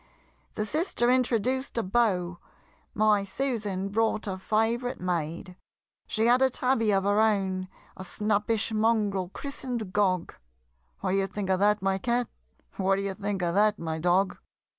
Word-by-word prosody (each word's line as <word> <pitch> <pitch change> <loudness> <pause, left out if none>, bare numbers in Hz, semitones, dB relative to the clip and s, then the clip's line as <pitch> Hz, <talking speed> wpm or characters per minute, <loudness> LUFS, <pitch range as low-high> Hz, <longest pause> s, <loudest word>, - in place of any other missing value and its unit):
The 215 - -1
sister 265 - +1
introduced 255 +1 0
a 230 - +1
Beau 185 -5 0 0.6
My 210 -1 +3
Susan 205 -4 -2
brought 220 +1 0
a 190 -2 -4
favorite 225 +5 0
maid. 175 0 -3 0.5
She 220 +1 0
had 245 +2 +4
a 265 - +5
tabby 250 -3 +1
of 195 -1 +2
her 205 +1 +2
own, 190 -4 +1 0.3
A 190 - -8
snappish 210 +3 0
mongrel 215 -4 +1
christen'd 245 -5 -5
Gog 185 -4 +1 0.7
What - - -1
d'ye 195 0 +1
think 195 -1 -3
of 185 - +2
that, 205 0 +2
my 195 0 +1
Cat? 240 +3 0 0.5
What 195 0 +2
d'ye 195 0 -2
think 200 -1 -3
of 170 -1 0
that, 210 +1 +3
my 160 -1 -4
Dog? 180 +3 +1
205 Hz, 150 wpm, -27 LUFS, 190-230 Hz, 0.7 s, a